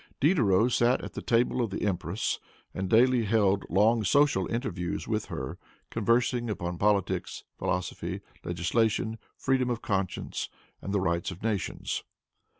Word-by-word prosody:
Diderot 125 - +4
sat 120 +2 +3
at - - -7
the - - -5
table 120 +2 +2
of 115 - 0
the 100 - -3
empress, 90 0 -1 0.3
and 95 0 -3
daily 120 +1 +5
held 100 -2 +2
long 110 +5 +4
social 135 -3 +3
interviews 110 -8 -2
with - - -1
her, - - -5 0.3
conversing 120 +2 +1
upon 90 -4 -3
politics, 100 -2 0 0.2
philosophy, 90 -1 -2 0.2
legislation, 110 +6 0 0.2
freedom 130 -1 +1
of 120 -1 -2
conscience 95 -3 -2 0.3
and 100 - -4
the 100 - +2
rights 85 -2 0
of 90 +2 -9
nations. 110 -4 -2
110 Hz, 140 wpm, -28 LUFS, 95-120 Hz, 0.3 s, daily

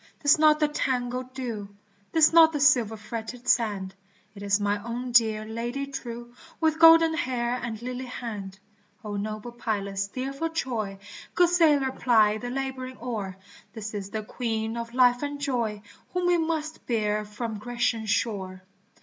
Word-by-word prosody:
'tis 290 +1 +5
not 305 -1 +5
the 300 - +3
tangled 255 -3 -2
dew, 230 -6 -5 0.4
'Tis 320 0 +5
not 325 -1 +8
the 295 - -1
silver 245 -6 +4
fretted 225 +3 -7
sand, 205 -5 +1 0.4
It 200 - -12
is 200 0 +2
my 205 0 0
own 240 +3 -5
dear 220 -2 +4
Lady 240 +5 -4
true 240 -3 -7 0.3
With 315 -1 +1
golden 330 0 +8
hair 250 -7 -1
and 225 -2 -4
lily 250 +1 -5
hand! 210 -6 -6 0.5
O 205 -1 -4
noble 215 +3 -4
pilot 205 -4 -3
steer 255 +8 -3
for 325 +4 -2
Troy, 230 -11 -3 0.4
Good 355 -1 +5
sailor 300 -6 +4
ply 215 -5 +3
the 245 - -5
laboring 260 0 -4
oar, 210 -6 -5 0.4
This 220 -1 -6
is 200 -2 -5
the 215 +1 -4
Queen 225 0 -3
of 235 0 -6
life 245 -1 +4
and 290 0 -4
joy 235 -7 -2 0.3
Whom 360 0 0
we 350 -1 +3
must 315 -1 -3
bear 215 -3 0
from 210 +1 -5
Grecian 235 -1 -1
shore 190 -4 -2
240 Hz, 160 wpm, -26 LUFS, 215-270 Hz, 0.5 s, not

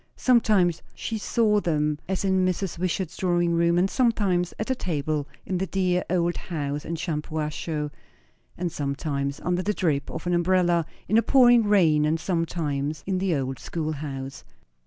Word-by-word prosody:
Sometimes 210 -9 +3
she 225 -1 -4
saw 210 -1 +2
them 150 -4 0
as 190 +1 -1
in 190 -1 +2
Mrs. 185 -1 -1
Wishart's 180 -1 -2
drawing 175 -2 +1
room, 170 +1 +3
and 180 +2 +3
sometimes 200 -7 +1
at 215 - -2
the 260 - 0
table 155 - -2 0.2
in 185 -2 -2
the 190 - -1
dear 180 -1 +1
old 175 -1 +1
house 145 -4 -4
in 170 - -3
Shampuashuh, 155 -1 -3 0.7
and 175 -1 -2
sometimes 140 -2 -2
under 180 +1 0
the 210 +2 -1
drip 145 -6 0
of 160 - -6
an 175 - 0
umbrella 175 -1 +2 0.2
in 220 - +4
a - - +3
pouring 245 -3 +5
rain, 165 -7 +4
and 160 +2 +1
sometimes 155 -4 -2
in 185 -1 -1
the 185 -3 +1
old 135 -1 -3
schoolhouse. 145 -4 -5
175 Hz, 160 wpm, -25 LUFS, 150-190 Hz, 0.7 s, pouring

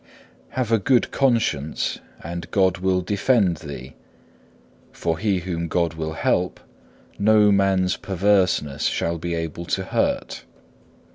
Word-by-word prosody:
Have 125 -3 0
a 115 - +4
good 125 +5 +2
conscience 115 - 0 0.2
and 85 +1 -6
God 95 -2 +2
will 95 0 +1
defend 100 -1 +2
thee, 70 -4 -9 1.0
for 80 -2 -2
he 100 -4 +1
whom 85 -2 -3
God 85 -1 0
will 80 0 -4
help 75 - 0 0.6
no 105 0 +5
man's 95 -2 +2
perverseness 95 -7 +1
shall 85 0 0
be 85 +1 -3
able 80 +1 -4
to 95 +2 -1
hurt. 95 - -1
90 Hz, 125 wpm, -23 LUFS, 85-100 Hz, 1.0 s, no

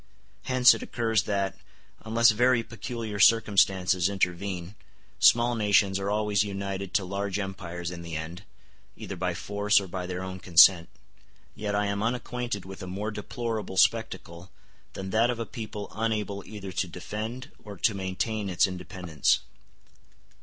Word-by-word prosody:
Hence 130 -1 +6
it - - -5
occurs 110 -3 0
that, 100 -1 -1 0.4
unless 115 +1 +4
very 120 +2 +3
peculiar 115 -2 -6
circumstances 95 -4 +4
intervene, 90 -1 -2 0.5
small 120 +1 +5
nations 100 -3 +2
are 100 +1 -2
always 105 -1 +1
united 100 -1 -4
to 100 - +2
large 100 +1 -3
empires 90 -3 -5
in 85 -1 -7
the 85 -1 -6
end, 80 +4 -6 0.5
either 100 - -7
by 90 -1 -2
force 105 +3 +2
or 100 - -6
by 90 0 -5
their 90 0 -4
own 95 0 -6
consent: 90 -1 +6 0.6
yet 105 -1 -3
I 105 0 +1
am 100 0 -2
unacquainted 120 -2 -3
with 95 0 -9
a 95 - -6
more 100 +4 -4
deplorable 110 -1 -4
spectacle 95 -5 +1 0.4
than 95 0 -6
that 115 +3 +3
of 120 - -1
a 115 - -3
people 110 -4 -7
unable 105 -3 -2
either 100 -3 -7
to - - -1
defend 115 +6 -6
or 105 -2 -9
to 110 - +2
maintain 100 +2 -2
its 90 +2 +3
independence. 90 -4 -1
100 Hz, 150 wpm, -27 LUFS, 95-110 Hz, 0.6 s, Hence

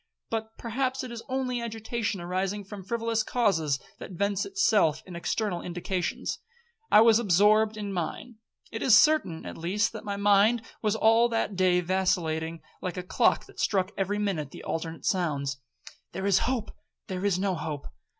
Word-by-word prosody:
But 225 0 -4
perhaps 255 +3 -2
it 255 - -6
is 235 -1 -6
only 255 -2 -1
agitation 225 -2 -3
arising 190 +3 -2
from 200 0 -9
frivolous 230 +2 -1
causes, 170 - +1 0.2
that - - -8
vents 200 - 0
itself 220 - +2
in 180 - -9
external 180 +1 -2
indications,—I 215 - -1
was 225 0 +6
absorbed 215 +2 +4
in 205 -2 -4
mine. 190 +6 -4 0.3
It 225 - -5
is 225 -4 +7
certain, 305 - +3
at - - -7
least, 190 +6 0
that - - -7
my 200 -2 -3
mind 205 +3 +4 0.2
was 215 -1 +1
all 225 +2 +4
that 225 -3 -1
day 180 -1 +3
vacillating 165 -3 -1 0.2
like 185 0 -4
a 180 - -3
clock 180 - +2
that - - -16
struck 190 -1 +1
every 200 +1 -1
minute 190 -9 -1
the - - -11
alternate 165 0 -4
sounds, 140 -8 0 0.6
'There 190 +2 -4
is 195 -2 +4
hope,—there 210 -5 -6
is 200 -3 +2
no 195 0 0
hope.' 150 -3 -5
200 Hz, 160 wpm, -27 LUFS, 180-225 Hz, 0.6 s, is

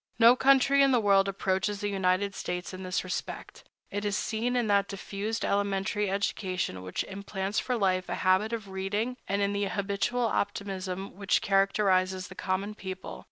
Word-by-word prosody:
No 235 +1 +8
country 275 +1 +5
in 275 - +6
the 250 - +4
world 200 -2 +4
approaches 195 +1 -1
the 205 - -2
United 195 0 +1
States 180 0 -4
in 185 - -7
this 185 -1 -2
respect. 185 - -6 0.3
It 205 0 -3
is 205 -2 0
seen 235 +3 -1
in 245 -2 +2
that 200 -2 +3
diffused 205 +2 -4
elementary 200 +1 0
education 185 - -2
which 90 0 -3
implants 200 0 -3
for 250 -2 -1
life 185 -3 +1
a - - -1
habit 190 +4 +3
of 220 -4 -4
reading, 205 +6 -2
and 200 +1 0
in 200 0 0
the 200 0 0
habitual 200 +5 -1
optimism 195 -3 -3
which 200 0 +1
characterizes 190 -2 +2
the - - -9
common 190 +3 -2
people. 190 -2 -7
200 Hz, 170 wpm, -29 LUFS, 190-210 Hz, 0.3 s, No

